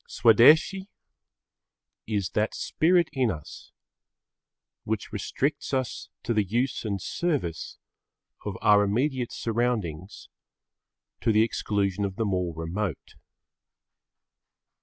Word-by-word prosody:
Swadeshi 155 Hz, -, +5 dB, 1.2 s
is 105 Hz, -4 st, -1 dB
that 105 Hz, +1 st, -1 dB
spirit 175 Hz, +1 st, +2 dB
in 130 Hz, -4 st, +1 dB
us 75 Hz, -7 st, -8 dB, 1.1 s
which -, -, -4 dB
restricts 140 Hz, 0 st, -2 dB
us 130 Hz, -3 st, -3 dB
to 115 Hz, -, -1 dB
the 105 Hz, -2 st, +2 dB
use 120 Hz, +7 st, -1 dB
and 100 Hz, -3 st, -2 dB
service 135 Hz, -, -3 dB, 0.7 s
of -, -, -4 dB
our 105 Hz, -1 st, +6 dB
immediate 125 Hz, +4 st, 0 dB
surroundings 110 Hz, -7 st, -2 dB, 0.9 s
to 115 Hz, -, +1 dB
the 110 Hz, 0 st, +5 dB
exclusion 100 Hz, -3 st, -1 dB
of 95 Hz, -1 st, -2 dB
the 115 Hz, -, -1 dB
more 90 Hz, -3 st, -1 dB
remote. 85 Hz, +1 st, -4 dB
110 Hz, 100 wpm, -26 LUFS, 100-130 Hz, 1.2 s, our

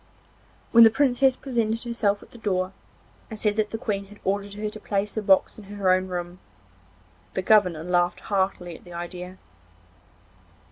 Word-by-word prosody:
When 230 Hz, 0 st, +9 dB
the 225 Hz, -, +9 dB
Princess 260 Hz, +2 st, +3 dB
presented 230 Hz, -4 st, -1 dB
herself 220 Hz, -4 st, -1 dB
at -, -, -19 dB
the 240 Hz, -, -13 dB
door, 185 Hz, -3 st, -1 dB, 0.6 s
and 220 Hz, -, -7 dB
said 210 Hz, -1 st, 0 dB
that 215 Hz, -1 st, +1 dB
the 225 Hz, -, -4 dB
Queen 200 Hz, -3 st, -3 dB
had 210 Hz, +1 st, -15 dB
ordered 200 Hz, +1 st, -2 dB
her 210 Hz, +1 st, -3 dB
to 215 Hz, +1 st, -7 dB
place 205 Hz, 0 st, -2 dB
the 220 Hz, -, -2 dB
box 195 Hz, +1 st, +3 dB
in 210 Hz, -, -12 dB
her 200 Hz, -2 st, 0 dB
own 185 Hz, 0 st, 0 dB
room, 175 Hz, 0 st, -5 dB, 1.0 s
the -, -, -1 dB
governor 180 Hz, -7 st, +3 dB
laughed 175 Hz, 0 st, +1 dB
heartily 190 Hz, -4 st, -1 dB
at -, -, -14 dB
the 175 Hz, -, -12 dB
idea. 180 Hz, +2 st, -7 dB
200 Hz, 175 wpm, -25 LUFS, 185-220 Hz, 1.0 s, When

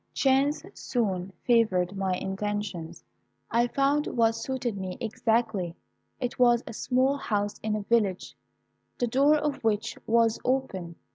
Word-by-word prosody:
"Chance 275 Hz, +2 st, +2 dB
soon 195 Hz, -6 st, -2 dB
favoured 200 Hz, -6 st, +2 dB
my 190 Hz, -1 st, 0 dB
intentions. 195 Hz, -3 st, -4 dB, 0.5 s
I 235 Hz, +1 st, +3 dB
found 280 Hz, +4 st, +1 dB
what 230 Hz, -1 st, +2 dB
suited 240 Hz, 0 st, -3 dB
me 190 Hz, -2 st, -5 dB
exactly. 220 Hz, -5 st, 0 dB, 0.4 s
It 245 Hz, -1 st, -3 dB
was 240 Hz, -1 st, +5 dB
a 230 Hz, -, -7 dB
small 260 Hz, +5 st, +1 dB
house 205 Hz, -6 st, -2 dB
in 215 Hz, 0 st, -1 dB
a 210 Hz, -, -3 dB
village, 200 Hz, -4 st, 0 dB, 0.6 s
the 245 Hz, -, +1 dB
door 275 Hz, +6 st, +4 dB
of 295 Hz, -3 st, -2 dB
which 215 Hz, -1 st, 0 dB
was 230 Hz, 0 st, +3 dB
open. 195 Hz, -10 st, -1 dB
225 Hz, 135 wpm, -27 LUFS, 195-255 Hz, 0.6 s, was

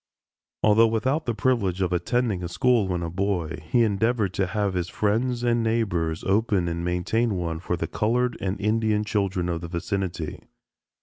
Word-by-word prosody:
Although 110 Hz, +2 st, +6 dB
without 130 Hz, +7 st, 0 dB
the 120 Hz, -, 0 dB
privilege 105 Hz, -7 st, +1 dB
of 90 Hz, -2 st, 0 dB
attending 105 Hz, +1 st, 0 dB
a -, -, -2 dB
school 115 Hz, +3 st, +2 dB
when 90 Hz, -2 st, -2 dB
a 85 Hz, -, -3 dB
boy, 90 Hz, -3 st, -1 dB
he 120 Hz, +4 st, +4 dB
endeavored 110 Hz, -1 st, +1 dB
to 95 Hz, -1 st, 0 dB
have 100 Hz, 0 st, -1 dB
his 90 Hz, -1 st, -2 dB
friends 120 Hz, +6 st, 0 dB
and 120 Hz, -1 st, +2 dB
neighbors 95 Hz, -8 st, 0 dB
open 100 Hz, -2 st, +1 dB
and 85 Hz, 0 st, -3 dB
maintain 95 Hz, +6 st, 0 dB
one 85 Hz, -3 st, -2 dB
for 90 Hz, 0 st, -2 dB
the 85 Hz, -, -2 dB
colored 120 Hz, +7 st, 0 dB
and 100 Hz, +1 st, -2 dB
Indian 105 Hz, 0 st, +1 dB
children 100 Hz, -4 st, -1 dB
of 85 Hz, -2 st, -2 dB
the 85 Hz, -, -5 dB
vicinity. 85 Hz, -1 st, -3 dB
100 Hz, 175 wpm, -25 LUFS, 90-115 Hz, -, Although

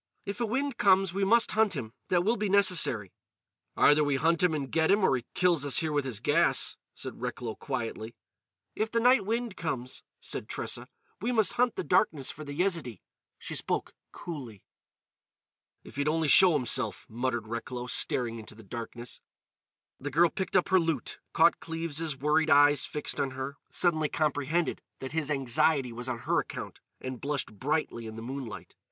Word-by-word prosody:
"If 200 Hz, +4 st, -5 dB
a 235 Hz, -, +1 dB
wind 270 Hz, +3 st, -2 dB
comes, 190 Hz, -2 st, +4 dB
we 195 Hz, +1 st, -1 dB
must 230 Hz, +4 st, +4 dB
hunt 215 Hz, -4 st, +2 dB
him. 115 Hz, -6 st, -5 dB
That 175 Hz, -1 st, +2 dB
will 225 Hz, +5 st, +2 dB
be 210 Hz, -3 st, -2 dB
necessary." 180 Hz, -, +3 dB, 0.7 s
"Either 150 Hz, +1 st, +5 dB
we 145 Hz, -1 st, +1 dB
hunt 165 Hz, +4 st, +2 dB
him 180 Hz, -3 st, +3 dB
and 140 Hz, -3 st, -4 dB
get 160 Hz, 0 st, +2 dB
him, 200 Hz, +1 st, +4 dB
or 135 Hz, -, +4 dB
he 125 Hz, -, -4 dB
kills 175 Hz, -5 st, +2 dB
us 140 Hz, -2 st, +2 dB
here 160 Hz, -2 st, +1 dB
with 145 Hz, -2 st, 0 dB
his 120 Hz, -6 st, -3 dB
gas," -, -, +2 dB, 0.2 s
said -, -, -7 dB
Recklow 125 Hz, -2 st, -4 dB
quietly. 115 Hz, -4 st, -5 dB, 0.6 s
"If 220 Hz, +1 st, -1 dB
the 230 Hz, -, +1 dB
night 245 Hz, -4 st, +4 dB
wind 230 Hz, -2 st, -2 dB
comes," 130 Hz, -6 st, -4 dB, 0.2 s
said -, -, -4 dB
Tressa, -, -, -4 dB, 0.3 s
"we 235 Hz, +4 st, 0 dB
must 220 Hz, -4 st, +2 dB
hunt 245 Hz, -1 st, +1 dB
the -, -, -3 dB
darkness 145 Hz, -10 st, +1 dB
for 155 Hz, -, -9 dB
the 145 Hz, -1 st, -7 dB
Yezidee." 165 Hz, -, -1 dB, 0.3 s
She -, -, -7 dB
spoke -, -, -2 dB, 0.2 s
coolly. 130 Hz, -, -8 dB, 1.2 s
"If -, -, -13 dB
he'd 145 Hz, +1 st, 0 dB
only 160 Hz, 0 st, +1 dB
show 185 Hz, +4 st, +8 dB
himself," 125 Hz, -5 st, +1 dB
muttered 120 Hz, -1 st, -2 dB
Recklow, 120 Hz, +2 st, -5 dB
staring 120 Hz, -2 st, +2 dB
into 110 Hz, 0 st, -11 dB
the 110 Hz, -, -14 dB
darkness. 120 Hz, +3 st, -8 dB, 0.8 s
The 145 Hz, -, -4 dB
girl 165 Hz, +4 st, +4 dB
picked 190 Hz, -2 st, -4 dB
up 180 Hz, -, +3 dB
her 190 Hz, 0 st, +5 dB
lute, 165 Hz, -7 st, -2 dB
caught -, -, +4 dB
Cleves' 165 Hz, -2 st, -3 dB
worried 150 Hz, +3 st, +2 dB
eyes 145 Hz, -1 st, +5 dB
fixed 150 Hz, -, -2 dB
on 135 Hz, -, -1 dB
her, 135 Hz, +1 st, -5 dB
suddenly 155 Hz, -4 st, +1 dB
comprehended 155 Hz, +1 st, 0 dB, 0.2 s
that 130 Hz, -, -7 dB
his 155 Hz, -2 st, -2 dB
anxiety 135 Hz, -1 st, +1 dB
was 120 Hz, +2 st, -5 dB
on 120 Hz, -, -2 dB
her -, -, +2 dB
account, -, -, -6 dB, 0.2 s
and 130 Hz, -1 st, -6 dB
blushed 140 Hz, -5 st, -2 dB
brightly 140 Hz, -5 st, -1 dB
in 110 Hz, -, -8 dB
the 115 Hz, -, -7 dB
moonlight. 130 Hz, -3 st, -7 dB
150 Hz, 180 wpm, -29 LUFS, 125-180 Hz, 1.2 s, show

